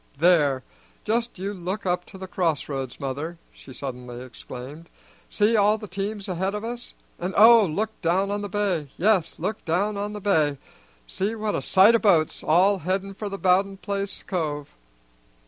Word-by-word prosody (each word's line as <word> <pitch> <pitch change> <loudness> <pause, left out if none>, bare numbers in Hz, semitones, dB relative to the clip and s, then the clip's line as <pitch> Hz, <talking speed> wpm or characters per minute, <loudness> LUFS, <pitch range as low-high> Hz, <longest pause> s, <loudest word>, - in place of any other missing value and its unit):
There, 145 -5 +3 0.4
just 230 +1 -1
you 195 +3 -3
look 190 +2 -4
up 180 -1 0
to 195 - -12
the 190 - -7
crossroads, 145 -8 -2
mother," 145 +5 -4 0.2
she - - -14
suddenly 125 -2 -7
exclaimed. 130 +6 -10 0.4
"See 215 +2 +2
all 210 0 +4
the 210 -1 -8
teams 200 +2 -4
ahead 190 +2 -1
of 210 - -4
us. 240 +1 -6 0.2
And, 180 +2 -3
oh, 225 -1 +8
look 210 +8 -1
down 190 +3 +1
on 205 0 -2
the 205 - -5
bay; 190 -7 -1
yes, 190 -4 +2
look 210 +6 -3
down 200 +5 0
on 205 +1 -3
the 210 - -5
bay! 155 -8 +2 0.5
See 200 - -2
what 215 -1 -2
a - - -1
sight 195 +4 +6
o' 230 - +4
boats, 170 -8 +3
all 185 +5 +4
headin' 190 +3 -2
for 205 +1 -5
the 195 - -5
Bowden 195 +1 +2
place 200 0 -4
cove!" 150 -6 -3
190 Hz, 175 wpm, -25 LUFS, 160-205 Hz, 0.5 s, oh